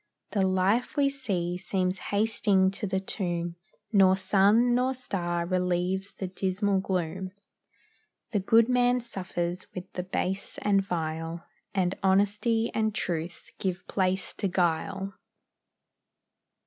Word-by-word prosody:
The 200 - +1
life 190 +8 +1
we 280 -1 +4
see 185 -10 -2
seems 185 0 -1
hasting 205 -2 +3
to 205 +2 -3
the 190 0 0
tomb 175 -3 -2 0.4
Nor 190 -2 +6
sun, 205 +5 +4
nor 255 +2 +2
star, 175 -8 -2
relieves 180 +2 -1
the 190 - -4
dismal 190 +2 0
gloom; 185 0 -2 1.0
The 210 - +1
good 225 +4 +4
man 250 0 +3
suffers 180 -5 -4
with 180 0 -7
the 180 - -2
base 190 +1 -3
and 200 -1 +4
vile, 165 -2 -3 0.3
And 185 -1 +2
honesty 205 +4 +2
and 220 -1 0
truth 170 -2 -3
give 185 -1 -3
place 190 -1 0
to 200 - +1
guile. 190 +2 0
190 Hz, 120 wpm, -28 LUFS, 180-205 Hz, 1.0 s, Nor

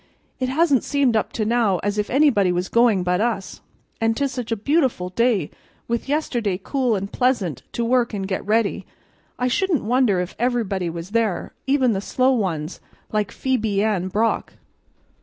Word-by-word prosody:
It 255 -1 -1
hasn't 285 -2 +3
seemed 280 -5 +1
up 220 - 0
to 215 - -1
now 225 -4 +2
as 205 +1 -1
if 210 - -1
anybody 245 -9 +3
was 180 +1 -2
going 230 -5 +3
but 180 +2 +1
us. 220 -4 -2 0.4
An' 225 0 +2
'tis 280 +2 -1
such 245 -3 -5
a - - +2
beautiful 250 - 0
day, 220 -5 +1 0.4
with 235 +3 -2
yesterday 240 -10 0
cool 255 -5 0
and 195 0 -4
pleasant 220 - 0
to 235 - -1
work 245 0 +2
an' 200 -3 -3
get 190 0 -3
ready, 215 0 0 0.5
I 250 - 0
shouldn't 350 +4 +1
wonder 235 -4 +2
if 180 0 -4
everybody 220 -7 0
was 170 +3 -7
there, 225 -4 -1
even 265 -3 +3
the 195 - -2
slow 255 +5 +2
ones 180 - -2 0.3
like 210 -1 -1
Phebe 220 -6 0
Ann 200 -4 0
Brock." 215 +4 0
225 Hz, 175 wpm, -22 LUFS, 195-255 Hz, 0.5 s, hasn't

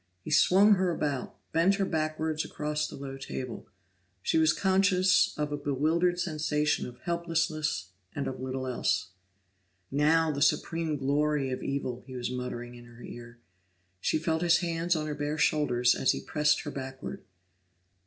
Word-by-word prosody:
He - - -6
swung 200 +3 +6
her 185 0 +1
about, 145 -6 -2 0.2
bent 170 +5 +3
her 195 -1 0
backwards 155 -1 -1
across 150 0 -2
the - - -9
low 135 -1 -7
table; 130 -3 -6 0.6
she 160 - +2
was 160 -1 +5
conscious 190 0 +3
of 150 -1 -2
a 145 - -1
bewildered 155 +6 +1
sensation 150 -3 0
of 125 0 -11
helplessness 165 - -1 0.3
and 140 - -2
of 130 - -5
little 130 0 -3
else. 125 -6 0 0.8
"Now 155 +3 +3
the 140 -1 -4
supreme 160 0 +1
glory 145 0 +1
of 130 - -3
evil!" 130 -3 -3
he 130 - -8
was 125 0 -3
muttering 125 -1 -5
in 120 0 -12
her 120 0 -14
ear. 120 0 -10 0.6
She 155 - +1
felt 160 0 -1
his 170 -1 +5
hands 170 0 0
on 155 -1 -2
her 150 - -3
bare 145 +1 -3
shoulders 130 -5 +3
as 130 - +2
he - - -4
pressed 150 0 +1
her 145 - -6
backward. 135 +8 -7
150 Hz, 165 wpm, -29 LUFS, 130-165 Hz, 0.8 s, swung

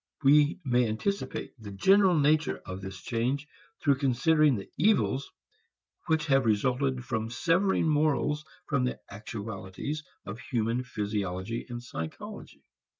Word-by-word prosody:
We 145 +2 +5
may 125 -2 +3
anticipate 200 - -3
the 105 - -8
general 190 - +4
nature 150 +1 +3
of 95 0 -6
this 95 -1 -7
change 130 +5 -1 0.3
through 140 -3 +2
considering 145 +2 +3
the 100 -3 -6
evils 165 -6 +2 0.8
which 160 -1 +2
have 135 -4 +3
resulted 125 +4 +1
from 110 -2 -2
severing 170 +8 +2
morals 150 -1 +1 0.2
from 140 -4 +1
the 125 - -3
actualities 105 +7 -5 0.2
of 105 +4 -6
human 115 +1 -1
physiology 105 -2 -3
and 120 0 -6
psychology. 80 -10 -7
125 Hz, 125 wpm, -29 LUFS, 110-150 Hz, 0.8 s, We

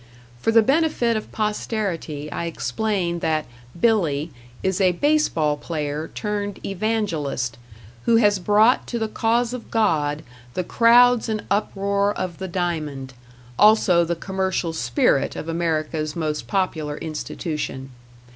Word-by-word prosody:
For 225 - +1
the 225 0 +6
benefit 275 -4 +2
of 215 - -4
posterity 195 -8 -3
I 170 - -3
explain 175 - -2
that 155 -2 0 0.3
"Billy" 165 -9 +1 0.3
is 190 0 0
a 185 -1 +4
baseball 175 - +1
player 150 0 -3
turned 205 -1 -3
Evangelist, 175 - -2 0.5
who 230 - +4
has 205 -3 +4
brought 210 +6 +3
to 240 - -3
the 220 -1 -1
cause 230 +2 0
of 250 -2 -7
God 155 -9 +1 0.3
the 180 - 0
crowds 240 +3 +5
and 215 -1 -2
uproar 200 0 +1
of 175 -3 -4
the 190 - -4
diamond; 155 -7 -3 0.5
also 205 -5 +5
the 170 +1 -1
commercial 190 -1 -2
spirit 125 -1 +1
of - - -6
America's 160 -2 -1
most 155 -3 -2
popular 160 -6 -1
institution. 150 -3 -5
185 Hz, 125 wpm, -22 LUFS, 155-215 Hz, 0.5 s, the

